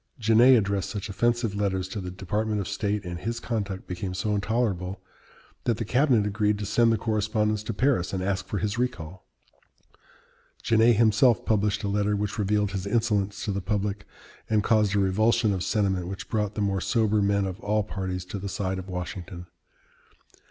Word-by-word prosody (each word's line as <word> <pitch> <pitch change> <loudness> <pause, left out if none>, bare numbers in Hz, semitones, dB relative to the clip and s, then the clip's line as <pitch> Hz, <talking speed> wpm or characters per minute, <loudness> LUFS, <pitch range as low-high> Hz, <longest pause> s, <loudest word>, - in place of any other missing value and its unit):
Genet 120 +2 +6
addressed 100 -2 -1
such 105 -1 -5
offensive 120 +1 0
letters 95 -2 -1
to 100 +2 -5
the 90 - -5
Department 105 +4 -2
of 95 - -3
State, 105 -2 -2
and 85 -1 -5
his 115 +5 -3
conduct 105 -6 -3
became 90 +1 -5
so 105 +3 -1
intolerable, 100 -3 -1 0.7
that 115 -3 +1
the 115 - -3
cabinet 125 -2 +3
agreed 105 0 +1
to 105 - -4
send 115 +3 +3
the 115 - +2
correspondence 110 0 0
to 105 - -4
Paris 120 -6 +1
and 95 -1 -2
ask 95 0 -2
for 105 - -3
his 105 +4 -2
recall. 95 -8 -4 1.4
Genet 115 +1 +4
himself 110 +1 +4
published 105 0 +1
a - - -1
letter 105 +1 +1
which 105 +2 -3
revealed 105 0 +1
his 95 0 -4
insolence 105 -3 0
to 105 - -1
the 100 0 -2
public, 100 0 -2 0.4
and 110 -2 +2
caused 105 -2 +2
a - - +3
revulsion 105 +3 +2
of 95 - -2
sentiment 95 -5 0
which 95 +1 -7
brought 105 -2 -1
the 105 - -2
more 100 -2 0
sober 110 -1 +1
men 100 0 +2
of 95 +1 -5
all 105 0 0
parties 95 -3 -4
to 100 +2 -6
the 100 +1 -5
side 95 0 -2
of 95 +1 -9
Washington. 90 0 -6
105 Hz, 185 wpm, -26 LUFS, 95-110 Hz, 1.4 s, Genet